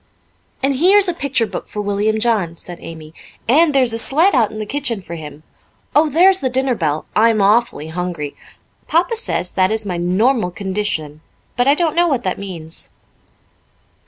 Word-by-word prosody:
"And 275 Hz, -1 st, +1 dB
here's 385 Hz, +6 st, +5 dB
a 355 Hz, -, 0 dB
picture 280 Hz, -7 st, 0 dB
book -, -, -7 dB
for 210 Hz, -, -7 dB
William 205 Hz, +1 st, 0 dB
John," 210 Hz, -8 st, 0 dB
said 175 Hz, 0 st, -8 dB
Amy, 160 Hz, -1 st, -10 dB, 0.3 s
"and 300 Hz, +7 st, +4 dB
there 270 Hz, -2 st, +3 dB
is 235 Hz, -2 st, 0 dB
a 225 Hz, -, 0 dB
sled 320 Hz, +11 st, +3 dB
out 230 Hz, -6 st, +3 dB
in 215 Hz, -, -9 dB
the 215 Hz, -, -4 dB
kitchen 245 Hz, -2 st, -1 dB
for 180 Hz, -3 st, -10 dB
him. 150 Hz, -2 st, -9 dB, 0.5 s
Oh, 305 Hz, +1 st, +4 dB
there's 370 Hz, +6 st, +5 dB
the 260 Hz, -, -1 dB
dinner 260 Hz, +1 st, +1 dB
bell. 155 Hz, -7 st, -2 dB
I'm 225 Hz, 0 st, +4 dB
awfully 205 Hz, -5 st, +2 dB
hungry. 170 Hz, -4 st, -4 dB, 0.5 s
Papa 350 Hz, +7 st, +1 dB
says 435 Hz, -, 0 dB
that 185 Hz, -1 st, +2 dB
is 220 Hz, 0 st, -1 dB
my 180 Hz, -3 st, -3 dB
'normal 190 Hz, +5 st, +1 dB
condition,' 185 Hz, -6 st, -3 dB, 0.3 s
but 245 Hz, +1 st, +1 dB
I 280 Hz, -, +5 dB
don't 330 Hz, -1 st, 0 dB
know 345 Hz, 0 st, +3 dB
what 270 Hz, -7 st, 0 dB
that 185 Hz, -, -2 dB
means." 170 Hz, -5 st, -6 dB
220 Hz, 185 wpm, -18 LUFS, 180-275 Hz, 0.5 s, here's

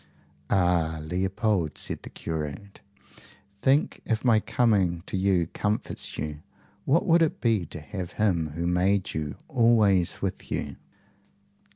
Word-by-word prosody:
"Ah, 85 Hz, -4 st, +2 dB
Leopold!" 90 Hz, +1 st, -1 dB
said -, -, -4 dB
the -, -, -9 dB
curate, 80 Hz, +5 st, -6 dB, 0.8 s
"think, 140 Hz, +3 st, +2 dB
if 115 Hz, +1 st, -2 dB
my 115 Hz, -3 st, +5 dB
coming 100 Hz, -8 st, +1 dB
to -, -, -5 dB
you 95 Hz, -2 st, +2 dB
comforts 105 Hz, +1 st, -2 dB
you, 75 Hz, 0 st, -4 dB, 0.4 s
what 165 Hz, +8 st, +3 dB
would 170 Hz, -2 st, +4 dB
it 160 Hz, -, +1 dB
be 110 Hz, -7 st, +1 dB
to 80 Hz, -, -7 dB
have 90 Hz, +2 st, -6 dB
him 85 Hz, -8 st, 0 dB
who 85 Hz, +1 st, -2 dB
made 90 Hz, +2 st, +1 dB
you 75 Hz, -2 st, -3 dB
always 110 Hz, -8 st, +3 dB
with 95 Hz, -1 st, -4 dB
you!" -, -, -3 dB
95 Hz, 135 wpm, -26 LUFS, 85-110 Hz, 0.8 s, my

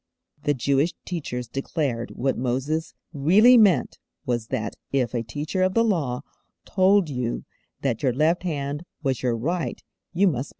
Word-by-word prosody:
_' -, -, -32 dB
The 145 Hz, -, +2 dB
Jewish 140 Hz, +5 st, +1 dB
teachers 125 Hz, -9 st, -4 dB
declared 135 Hz, -2 st, -2 dB
what 135 Hz, +1 st, 0 dB
Moses 135 Hz, +6 st, -2 dB, 0.2 s
really 190 Hz, -, +6 dB
meant 195 Hz, -, +4 dB, 0.3 s
was 120 Hz, -2 st, -1 dB
that 110 Hz, -, -3 dB, 0.2 s
if 130 Hz, -4 st, 0 dB
a 120 Hz, -, 0 dB
teacher 145 Hz, -, -3 dB
of 185 Hz, 0 st, +2 dB
the 230 Hz, -, +5 dB
Law 155 Hz, -, 0 dB, 0.4 s
told 190 Hz, -1 st, +3 dB
you 125 Hz, -4 st, -3 dB, 0.4 s
that 125 Hz, -5 st, 0 dB
your 130 Hz, -, +2 dB
left 155 Hz, +7 st, +2 dB
hand 145 Hz, -3 st, -3 dB, 0.2 s
was 130 Hz, -5 st, 0 dB
your 120 Hz, -2 st, 0 dB
right 165 Hz, +8 st, -2 dB, 0.3 s
you 185 Hz, +3 st, +2 dB
must 175 Hz, -, +3 dB
believe 120 Hz, -, -2 dB
him! 135 Hz, -, -5 dB
140 Hz, 170 wpm, -24 LUFS, 125-175 Hz, 0.4 s, really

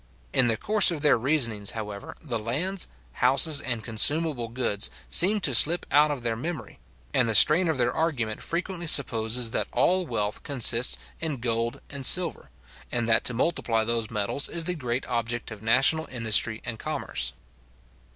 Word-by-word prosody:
In 125 Hz, -, +4 dB
the 115 Hz, -1 st, 0 dB
course 210 Hz, -, +3 dB
of 165 Hz, -4 st, -5 dB
their 150 Hz, -, +4 dB
reasonings, 115 Hz, -6 st, -1 dB
however, 105 Hz, -2 st, -8 dB
the 120 Hz, -7 st, -4 dB
lands, 165 Hz, -, -3 dB, 0.2 s
houses, 135 Hz, -, +5 dB
and 120 Hz, -4 st, -4 dB
consumable 135 Hz, +3 st, +1 dB
goods, 115 Hz, -4 st, -2 dB, 0.2 s
seem 205 Hz, +5 st, +4 dB
to 140 Hz, -, +2 dB
slip 165 Hz, +8 st, +3 dB
out 150 Hz, +2 st, +4 dB
of 140 Hz, -5 st, -5 dB
their 115 Hz, -1 st, -2 dB
memory; 155 Hz, +5 st, -7 dB, 0.3 s
and 120 Hz, -2 st, +1 dB
the 110 Hz, -, 0 dB
strain 170 Hz, -, +6 dB
of 160 Hz, -, -2 dB
their 120 Hz, -1 st, 0 dB
argument 125 Hz, -10 st, -3 dB
frequently 175 Hz, 0 st, -4 dB
supposes 115 Hz, -4 st, +1 dB
that -, -, -2 dB
all 185 Hz, 0 st, +1 dB
wealth 105 Hz, -3 st, -4 dB
consists 125 Hz, -3 st, +2 dB, 0.2 s
in 160 Hz, -4 st, -4 dB
gold 115 Hz, 0 st, -3 dB
and 140 Hz, -2 st, -8 dB
silver, 175 Hz, -, +3 dB, 0.4 s
and 120 Hz, -1 st, -2 dB
that 115 Hz, -1 st, +2 dB
to 125 Hz, -, -1 dB
multiply 115 Hz, -5 st, -1 dB
those 115 Hz, -1 st, -2 dB
metals 105 Hz, +7 st, -2 dB
is 170 Hz, -1 st, -4 dB
the 180 Hz, +2 st, -3 dB
great 125 Hz, -5 st, -4 dB
object 120 Hz, -1 st, -4 dB
of 105 Hz, -2 st, -10 dB
national 135 Hz, +8 st, +2 dB
industry 110 Hz, -2 st, 0 dB
and 115 Hz, -3 st, -6 dB
commerce. 60 Hz, +2 st, -4 dB
125 Hz, 170 wpm, -25 LUFS, 115-155 Hz, 0.4 s, strain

